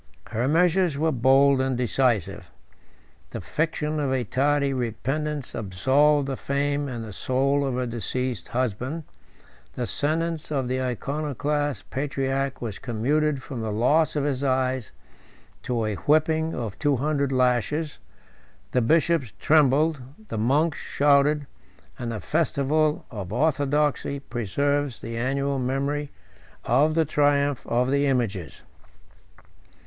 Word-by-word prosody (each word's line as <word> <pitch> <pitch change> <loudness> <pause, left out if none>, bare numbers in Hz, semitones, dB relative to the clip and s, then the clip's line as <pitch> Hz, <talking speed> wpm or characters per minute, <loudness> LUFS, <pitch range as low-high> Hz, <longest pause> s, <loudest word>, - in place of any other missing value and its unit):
Her 120 +4 0
measures 170 0 +3
were 160 +2 +1
bold 135 +1 +4
and 130 -1 0
decisive. 125 -4 0 0.8
The - - -6
fiction 155 -1 -2
of 140 -3 0
a 130 -2 +1
tardy 140 +4 +1
repentance 135 +4 -3
absolved 135 +8 +2
the 135 - -2
fame 145 +2 -1
and 120 -4 -5
the 105 - -8
soul 135 +6 +1
of 135 -3 -1
her 125 0 -1
deceased 120 +1 -3
husband; 130 +6 -2 0.7
the 125 - -3
sentence 155 - -1
of 135 -4 -1
the 130 +1 -1
Iconoclast 145 +1 -2
patriarch 135 -1 -2
was 110 -4 -5
commuted 135 +4 0
from 130 -5 -6
the 110 -1 -2
loss 145 +10 +2
of 145 - 0
his 140 -2 -1
eyes 130 -3 0 0.7
to 120 -3 -1
a 110 - -1
whipping 155 +6 +1
of 115 -5 -5
two 145 -2 +2
hundred 140 +1 0
lashes: 130 +4 0 0.7
the 125 - +2
bishops 155 - +2
trembled, 150 - +3 0.3
the - - -3
monks 145 +7 +1
shouted, 145 +1 +2 0.5
and 120 -1 -3
the 110 - -4
festival 150 - 0
of 100 -5 -6
orthodoxy 145 +1 +1
preserves 140 +3 -1
the 115 +1 -6
annual 135 +3 -1
memory 140 +3 -1 0.6
of 150 +6 +3
the 165 -1 +3
triumph 145 -2 +1
of 125 +2 +1
the 140 0 +2
images. 110 - -2
140 Hz, 130 wpm, -25 LUFS, 125-150 Hz, 0.8 s, bold